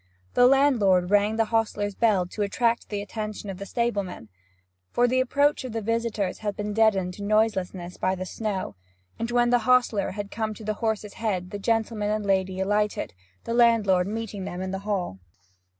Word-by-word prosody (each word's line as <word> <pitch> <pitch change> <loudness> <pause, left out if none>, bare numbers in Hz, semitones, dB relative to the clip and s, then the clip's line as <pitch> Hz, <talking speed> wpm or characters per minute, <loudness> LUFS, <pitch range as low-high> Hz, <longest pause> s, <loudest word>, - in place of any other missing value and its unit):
The 245 - +6
landlord 220 -10 +3
rang 205 +1 +3
the 225 0 +2
hostler's 210 -2 0
bell 205 -4 +2
to 195 +4 -6
attract 230 +3 0
the 205 -1 -3
attention 215 -1 -5
of 185 - -9
the 200 - -6
stable 235 -3 0
man, 180 - -9 0.6
for 245 - +2
the 255 +1 +2
approach 285 +3 +2
of 255 -3 -6
the 225 - -2
visitors 230 -3 -1
had 205 -2 -3
been 210 0 -3
deadened 200 -4 +2
to 200 - -8
noiselessness 190 -4 0
by 185 0 0
the 185 0 -5
snow, 195 - -4 0.4
and 230 +1 -2
when 240 0 +2
the 245 - +5
hostler 245 -5 +3
had 205 +1 -6
come 220 -1 -3
to 220 - -11
the 215 0 -1
horse's 215 -2 -1
head 190 -5 -2
the 205 - -5
gentleman 220 -1 0
and 215 0 -1
lady 190 -1 0
alighted, 205 +2 0 0.3
the 230 - -3
landlord 220 -6 +4
meeting 215 -2 -4
them 180 -1 -5
in 185 0 -3
the 190 - -3
hall. 180 - -2
210 Hz, 190 wpm, -26 LUFS, 195-230 Hz, 0.6 s, The